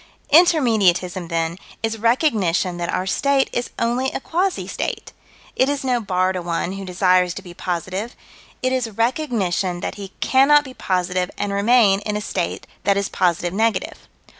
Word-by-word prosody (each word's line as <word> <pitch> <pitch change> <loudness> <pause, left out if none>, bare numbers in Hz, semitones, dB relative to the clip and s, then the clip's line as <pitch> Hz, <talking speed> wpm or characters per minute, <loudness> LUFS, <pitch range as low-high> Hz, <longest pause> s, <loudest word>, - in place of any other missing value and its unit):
Intermediatism, 215 - +3
then, 165 +1 -2 0.2
is 225 0 -2
recognition 210 - +1
that 175 -1 -3
our 185 - -1
state 275 +7 +1
is 240 - -2
only 245 +3 0
a - - -3
quasi 365 +6 -1
state: - - -4 0.4
it 260 - +2
is 285 -1 -2
no 250 -2 +1
bar 185 -2 0
to 185 - -3
one 170 +1 -2
who 195 0 -6
desires 180 -1 +2
to 195 - -7
be 175 -2 -11
positive: 185 +6 -4 0.5
it 255 0 +1
is 250 -3 -1
recognition 215 - -1
that - - -4
he 195 -1 -8
cannot 285 +3 +5
be 260 -2 -10
positive 180 -3 -1
and 200 -1 -2
remain 200 -1 +4
in 210 0 -3
a - - -4
state 185 -3 -3 0.2
that 200 -1 +2
is 200 0 -1
positive 175 -1 0
negative. 220 -1 -1
200 Hz, 165 wpm, -21 LUFS, 180-250 Hz, 0.5 s, cannot